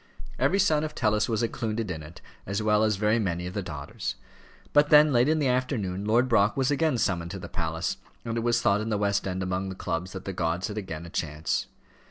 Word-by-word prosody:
Every 195 - +3
son 160 -6 +3
of 155 - -4
Tellus 105 -1 +1
was 115 0 0
included 110 -2 -2
in 80 -3 -5
it, 75 +3 -12 0.3
as 100 +2 -1
were 105 - +1
also 105 -1 +3
very 105 +3 +2
many 90 -4 -1
of 90 - -5
the 100 - -2
daughters. 75 -6 -5 0.6
But 145 0 +5
then, 150 -1 +7
late 120 +3 +4
in 160 - +3
the 145 -3 +1
afternoon, 115 -7 -1
Lord 120 +4 +3
Brock 110 -2 +3
was 135 +1 +2
again 150 -2 +2
summoned 85 -6 0
to 100 - -5
the - - -7
palace, 80 -2 -2 0.3
and 115 -1 -2
it - - 0
was 120 0 +1
thought 100 +1 +3
in 110 - -3
the 105 - +1
West 100 -1 0
End 95 0 -2
among 95 +1 -2
the 95 - -6
clubs 90 0 -3
that 95 -1 -7
the 95 - -3
gods 85 +3 -1
had 105 - -6
again 85 -4 -6
a 85 - -10
chance. 75 0 -2
105 Hz, 240 wpm, -27 LUFS, 90-120 Hz, 0.6 s, then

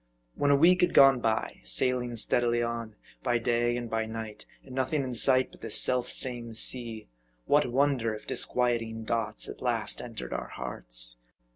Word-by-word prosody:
When 145 - 0
a 140 - +5
week 175 +5 +4
had 180 - +1
gone 135 -2 +7
by, 110 -2 -2
sailing 120 - 0
steadily 120 +1 +1
on, 115 -2 -5 0.3
by 120 - +1
day 120 0 0
and 120 -1 -5
by 110 0 -2
night, 110 -1 -8 0.2
and 130 - -12
nothing 135 +3 -1
in 130 -1 -5
sight 130 +2 +2
but - - -18
this 115 - +2
self 125 -1 +1
same 120 -3 -2
sea, 115 -2 +3 0.4
what 145 -4 +2
wonder 130 -3 +1
if 105 - -12
disquieting 115 -2 0
thoughts 110 -2 -1
at - - -9
last - - -1
entered - - -7
our - - -4
hearts - - -3
120 Hz, 170 wpm, -28 LUFS, 110-130 Hz, 0.4 s, gone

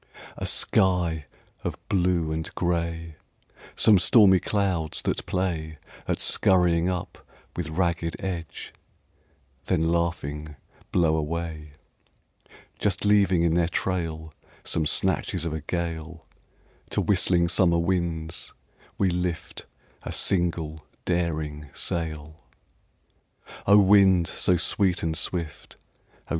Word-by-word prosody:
A - - -4
sky 90 -5 +1 0.4
of - - -3
blue 90 -4 +1
and 80 0 -3
grey; 85 -2 -2 0.6
Some 105 -4 +5
stormy 95 -1 +6
clouds 95 -7 -1
that - - -1
play 80 -4 -2 0.3
At - - -1
scurrying 90 -2 +3
up 90 -2 -4 0.4
with 85 -2 -3
ragged 85 0 -1
edge, 85 -4 -6 0.9
then 80 -3 +1
laughing 75 -3 -2 0.4
blow 80 -3 +3
away, 80 -1 -4 1.1
Just 100 -1 -1
leaving 100 -4 +4
in 85 -1 +2
their 85 -1 +2
trail 80 -3 -3 0.3
Some 80 -2 -1
snatches 90 0 0
of 80 - -2
a 80 - -4
gale; 85 0 -5 0.6
To - - -1
whistling 85 -2 +2
summer 85 -1 +3
winds 85 -2 -2 0.4
we 95 -2 +2
lift 90 -2 -4 0.3
a - - -6
single 85 -4 -1 0.2
daring 75 -4 -2
sail. 80 -2 -3 1.3
O! 100 +1 +7
wind 95 -3 +5
so 90 +1 +1
sweet 95 +1 +1
and 80 -1 -1
swift, 85 -2 -4 0.5
O! - - -22
85 Hz, 110 wpm, -25 LUFS, 80-90 Hz, 1.3 s, O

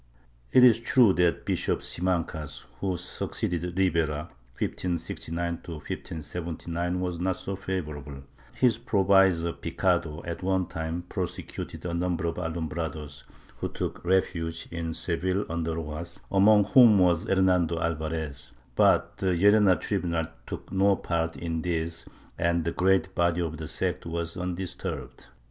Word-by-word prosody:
It 130 - +7
is 115 -3 +7
true 115 -3 +5
that 90 -2 +1
Bishop - - 0
Simancas, 85 -4 -2
who 95 -2 -1
succeeded 90 +1 -3
Ribera 80 -5 +1 0.3
(1569 85 -1 -2
1579) 85 +2 -4
was 90 -2 -2
not 95 +1 0
so 100 - -4
favorable, 75 -7 -4
and 70 0 -10 0.3
his 120 -3 +3
pro 110 -4 +1
visor, 95 -4 +4
Picado, 85 -3 -1
at 85 +1 -5
one 95 0 +1
time 80 +1 -4
prosecuted 90 -1 -5
a 85 - -2
number 85 -1 -1
of 85 - -2
Alumbrados, 80 -3 -4 0.3
who - - -3
took - - -4
refuge 85 -3 0
in 85 -1 -3
Seville 95 +3 -1
under 80 -1 -2
Rojas, 80 +1 -5
among 105 +2 +6
whom 110 0 +7
was 90 -3 +3
Her 95 - +2
nando 90 -3 +3
Alvarez, 80 -3 -3 0.2
but - - +3
the 95 -2 +1
Llerena 100 -1 +5
tribunal 85 -5 -1 0.2
took - - -7
no 100 +1 +4
part 85 -2 -2
in 80 -1 -3
this 85 -1 -2 0.3
and 85 0 +2
the 85 - -1
great 95 +1 +2
body 85 -1 +2
of 80 -2 -3
the 80 0 -6
sect - - -2
was 85 0 -3
undisturbed. 90 0 -5
85 Hz, 140 wpm, -27 LUFS, 80-95 Hz, 0.3 s, It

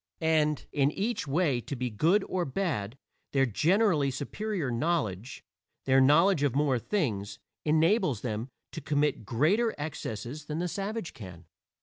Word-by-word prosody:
And 155 -2 +1
in 140 -1 +2
each 205 +4 -2
way 140 -4 +1
to 140 - -5
be 125 -1 -3
good 170 - +3
or 185 -1 -1
bad, 135 - -2 0.4
their 135 -1 +4
generally 155 - +2
superior 150 +3 -3
knowledge 120 - -2 0.4
their 135 0 +5
knowledge 160 +5 +5
of 140 -3 +1
more 140 -4 +2
things 105 - -2 0.3
enables 155 - +2
them 115 +1 -3 0.2
to 160 - -6
commit 145 -6 0
greater 195 - +2
excesses 145 -2 -5
than 150 +1 -4
the 175 +2 -1
savage 200 +1 -4
can. 90 -5 -11
150 Hz, 140 wpm, -29 LUFS, 125-175 Hz, 0.4 s, their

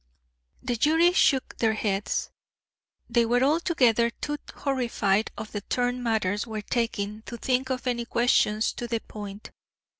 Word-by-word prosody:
The 245 -2 -1
jury 325 +7 +4
shook 270 -7 +2
their 220 -1 +2
heads. 205 -2 -1 0.8
They 235 0 +3
were 245 +2 +2
altogether 265 -7 +3
too 295 +5 -4 0.2
horrified 235 -6 0
at 215 - -6
the 205 - -5
turn 245 +3 -1
matters 215 -2 0
were 215 -2 -5
taking 215 -3 -2
to 235 - -6
think 255 +2 0
of 255 -1 -3
any 240 -2 -1
questions 230 -3 +2
to 240 - -5
the 230 -1 -1
point. 205 -1 -9
235 Hz, 145 wpm, -26 LUFS, 215-255 Hz, 0.8 s, jury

